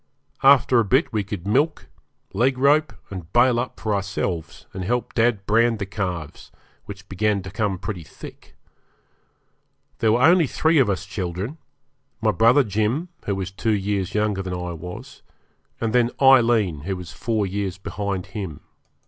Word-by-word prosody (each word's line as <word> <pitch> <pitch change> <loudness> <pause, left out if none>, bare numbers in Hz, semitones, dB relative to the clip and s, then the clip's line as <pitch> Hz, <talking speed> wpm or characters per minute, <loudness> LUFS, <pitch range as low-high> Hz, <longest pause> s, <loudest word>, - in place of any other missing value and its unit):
After 135 -2 +5
a - - +4
bit 130 - +1
we 105 -2 0
could 100 -2 -6
milk, 145 +10 +1 0.5
leg 125 +6 +1
rope, 145 +4 +3 0.2
and 90 -4 -8
bail 120 0 +4
up 125 - -5
for 110 -1 -1
ourselves, 90 -4 -3
and 95 - -5
help 120 +6 -2
dad 115 -4 +1
brand 115 +2 +3
the 100 - -3
calves, 90 -6 -5 0.3
which 100 -1 -10
began 100 0 0
to 95 - -8
come 100 -2 -1
pretty 90 0 -5
thick. 75 - -13 1.4
There 110 - +3
were 120 +2 +2
only 170 0 +5
three 160 +4 +2
of 125 -6 +3
us 95 -1 -2
children 95 - -5 0.6
my 110 -1 +2
brother 115 +8 +4
Jim, 110 - -1 0.2
who 100 - 0
was 95 -1 -4
two 110 +3 0
years 100 -1 -2
younger 105 -2 0
than 95 -1 -4
I 90 0 -4
was, 90 +2 -9 0.6
and 115 -1 -1
then 120 -1 +3
Aileen, 120 - +4
who 95 +7 -4
was 90 -2 -8
four 110 -3 -1
years 95 -1 -3
behind 95 -1 -4
him. 95 -9 -6
105 Hz, 165 wpm, -23 LUFS, 95-120 Hz, 1.4 s, After